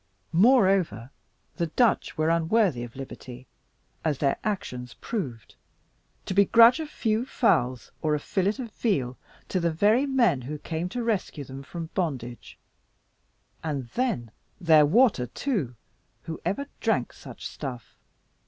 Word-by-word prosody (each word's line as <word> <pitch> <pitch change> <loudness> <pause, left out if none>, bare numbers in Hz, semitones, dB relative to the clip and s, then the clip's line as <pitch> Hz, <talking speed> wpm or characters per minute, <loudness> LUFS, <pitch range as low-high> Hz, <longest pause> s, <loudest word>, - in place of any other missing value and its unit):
Moreover, 185 - +3 0.5
the 170 - 0
Dutch 230 +4 +1
were 155 +1 +2
unworthy 170 - +2
of 120 -1 -9
liberty, 130 -1 -9 0.6
as 150 -4 0
their 140 -1 +1
actions 125 - -4
proved, 130 - -5 0.7
to - - -3
begrudge 230 - +6
a 315 - -4
few 225 -5 -1
fowls, 130 - +1
or 155 -1 +1
a - - -2
fillet 195 +7 0
of 245 -4 -6
veal, 135 - -1 0.3
to 185 - 0
the 170 -1 +1
very 215 - +3
men 240 - +3
who 145 +5 -5
came 165 +3 -4
to 245 +5 -3
rescue 205 -9 -2
them 135 0 -9
from 165 +3 -7
bondage; 130 - -4 1.1
and 140 -6 -3
then 125 - -1 0.3
their 160 -5 +6
water, 205 - +4
too, 160 - -2 0.5
who 160 - -6
ever 280 +8 -1
drank - - 0
such - - -11
stuff? 120 -7 -7
165 Hz, 135 wpm, -26 LUFS, 130-220 Hz, 1.1 s, begrudge